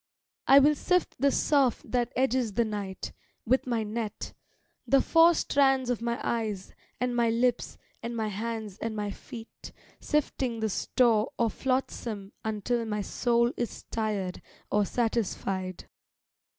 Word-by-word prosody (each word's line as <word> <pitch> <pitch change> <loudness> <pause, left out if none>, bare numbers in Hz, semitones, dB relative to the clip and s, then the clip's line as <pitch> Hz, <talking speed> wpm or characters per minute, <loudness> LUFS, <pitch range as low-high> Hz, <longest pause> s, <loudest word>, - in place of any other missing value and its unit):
I 270 - +8
will 285 +2 +7
sift 360 +4 +1
the 280 +2 +4
surf 275 -3 +2
that 245 -1 -1
edges 255 -4 +1
the 235 +3 +2
night, 200 -3 -5 0.3
with 260 +3 +2
my 235 -3 0
net, 215 0 -4 0.5
the 275 - +5
four 330 +3 +5
Strands 270 -4 +2
of 235 - -2
my 235 0 -1
eyes 215 -5 -2 0.3
and 250 -1 0
my 235 -1 +3
lips 240 +1 0 0.2
and 235 0 -4
my 220 -1 -1
hands 220 -1 -4
and 225 -1 -3
my 205 -1 -2
feet, 225 +2 -10 0.3
sifting 260 -5 -1
the 220 0 0
store 220 +2 +2
Of 230 -2 +1
flotsam 235 -6 -2
until 220 +2 -1
my 210 -1 -2
soul 235 +3 +1
is 240 - -4
tired 210 -5 -2 0.3
or 210 0 +3
satisfied. 195 -5 -2
230 Hz, 140 wpm, -28 LUFS, 215-250 Hz, 0.5 s, I